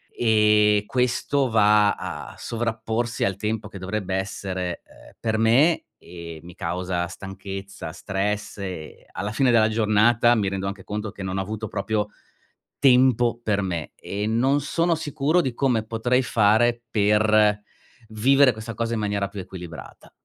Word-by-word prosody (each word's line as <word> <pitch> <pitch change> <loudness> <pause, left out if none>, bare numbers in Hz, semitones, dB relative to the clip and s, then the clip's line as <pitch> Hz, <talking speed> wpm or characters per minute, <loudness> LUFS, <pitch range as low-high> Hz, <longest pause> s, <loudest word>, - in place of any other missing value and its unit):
ehm, 105 -2 +3
questo 130 +2 0
va 105 -2 +4
a - - -7
sovrapporsi 115 0 -2
al 95 -1 0
tempo 110 +1 -3
che 100 - -9
dovrebbe 95 0 -3
essere, 95 -2 -4
ehm, - - -18
per 110 -1 -1
me, 130 +9 +4
e 85 -2 -10
mi 90 +1 -11
causa 90 0 -2
stanchezza, 95 -1 -8
stress 100 +2 -3
e 90 -5 -7
alla 100 +1 -4
fine 130 +1 +3
della 110 -2 +5
giornata 110 +2 +3
mi 105 -3 0
rendo 95 0 -4
anche 100 -1 -6
conto 105 0 -4
che 100 -1 -8
non 95 0 -3
ho - - 0
avuto 110 +3 -5
proprio 105 +1 -2 0.7
tempo 125 -3 +4
per 105 -3 +1
me; 85 -5 -4
e 105 +1 -4
non 130 +6 +2
sono 170 +4 +1
sicuro 155 +3 +1
di 130 -6 -2
come 125 -5 +1
potrei 120 +3 +1
fare 115 +1 +2
per 105 0 +3 0.5
vivere 130 +5 +4
questa 110 +1 -7
cosa 115 +1 -2
in - - -2
maniera 100 -1 -1
più 100 - -8
equilibrata. 90 -3 -10
105 Hz, 150 wpm, -24 LUFS, 100-120 Hz, 0.7 s, della